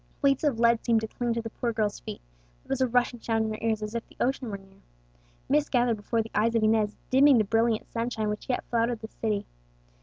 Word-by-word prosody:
Weights 275 0 +3
of 280 -7 +1
lead 235 -1 +4
seemed 230 -2 +3
to 220 - -3
cling 240 +2 -2
to 230 - -2
the 225 - -6
poor 240 0 -2
girl's 215 -2 -1
feet, - - -8 0.4
there - - -26
was 270 -1 -1
a 260 - +4
rushing 245 0 +1
sound 225 -1 0
in 220 - -2
her 215 - -5
ears 220 -2 0
as 210 +1 -5
if 235 0 -2
the - - -21
ocean 260 -1 0
were 200 - -4
near. 195 0 -21 0.7
Mist 295 +1 +2
gathered 240 -3 +2
before 225 +2 -1
the 225 - -12
eyes 225 +2 +2
of 225 - +2
Inez, 215 -1 +2
dimming 270 +1 +6
the 220 - +4
brilliant 225 +1 +1
sunshine 230 -2 -2
which 210 +4 -5
yet 250 - 0
flooded 235 -1 +1
the 220 - -6
city. 215 -3 -2
230 Hz, 245 wpm, -27 LUFS, 215-245 Hz, 0.7 s, dimming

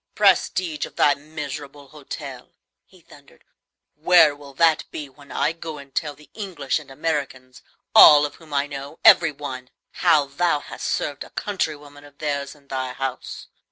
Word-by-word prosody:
"Prestige 180 -5 +2
of - - -19
thy 145 - +4
miserable 145 -1 -8
hotel!" 150 -1 -9 0.3
he - - -21
thundered; - - -19 0.5
"where 155 -1 +5
will 140 -1 -14
that 165 +1 +3
be 150 - -7
when 140 +1 -17
I 150 - 0
go 165 -2 -8
and 140 -1 -13
tell 150 -2 -2
the 150 -2 -20
English 180 -10 -3
and 145 - -15
Americans 135 -3 -4 0.3
all 150 -1 +9
of 145 - -6
whom 160 -2 -17
I 140 0 +1
know, 140 +1 -8
every 165 -2 +7
one! 130 -3 -8 0.3
how 155 -5 +4
thou 150 +2 0
hast - - -7
served 145 -2 -2
a - - -14
countrywoman 150 -7 -4
of 145 -1 -17
theirs 140 -1 -3
in 140 -1 -24
thy 130 -1 -4
house? 135 -1 -5
145 Hz, 165 wpm, -22 LUFS, 140-155 Hz, 0.5 s, all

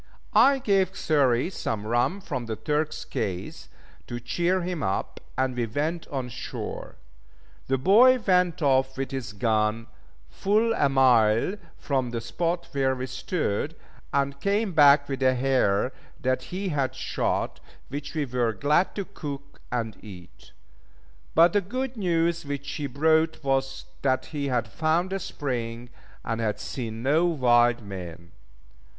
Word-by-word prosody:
I 275 0 +6
gave 195 -7 +1
Xury 140 0 +2
some 110 - -3
rum 120 - +1
from 130 -10 -4
the 110 - -2
Turk's 150 +4 -2
case 95 -4 -4 0.4
to 120 - -5
cheer 175 +10 0
him 175 -2 -3
up, 95 -4 -2 0.2
and 130 -1 0
we 120 -2 -1
went 155 +8 -2
on 135 -5 -3
shore. 120 - -6 0.7
The 135 - +1
boy 230 - +6
went 180 -7 +2
off 130 -1 +2
with 135 0 -3
his 130 -6 -4
gun, 110 +1 0 0.4
full 215 - +1
a 145 -10 +2
mile 125 - +4 0.2
from 130 -4 -1
the 120 -1 -3
spot 170 +9 -2
where 135 -2 +1
we 130 0 -4
stood, 130 - -2 0.4
and 140 0 -1
came 200 0 +1
back 145 -2 +6
with 135 -1 -4
a 130 -1 +4
hare 125 -3 +2 0.3
that 130 0 0
he 190 +2 -4
had 140 -5 -1
shot, - - -2 0.3
which 145 +3 -6
we 150 -2 0
were 120 -3 0
glad 150 - +1
to 200 - -3
cook 140 -4 -8
and 115 -3 -3
eat; 90 -5 -13 0.8
but 165 +1 +6
the 205 - +3
good 255 +7 -4
news 170 -4 +1
which 140 -1 -5
he 145 - -3
brought 160 +4 +2
was 135 0 -1 0.2
that 130 -1 +1
he 145 -2 -2
had 120 -4 0
found 165 - 0
a 195 - -1
spring, 120 -7 -4 0.3
and 115 0 -2
had 110 -2 -1
seen 115 -3 -5
no 155 +6 +3
wild 120 -7 +3
men. 90 -4 -8
135 Hz, 150 wpm, -26 LUFS, 120-170 Hz, 0.8 s, I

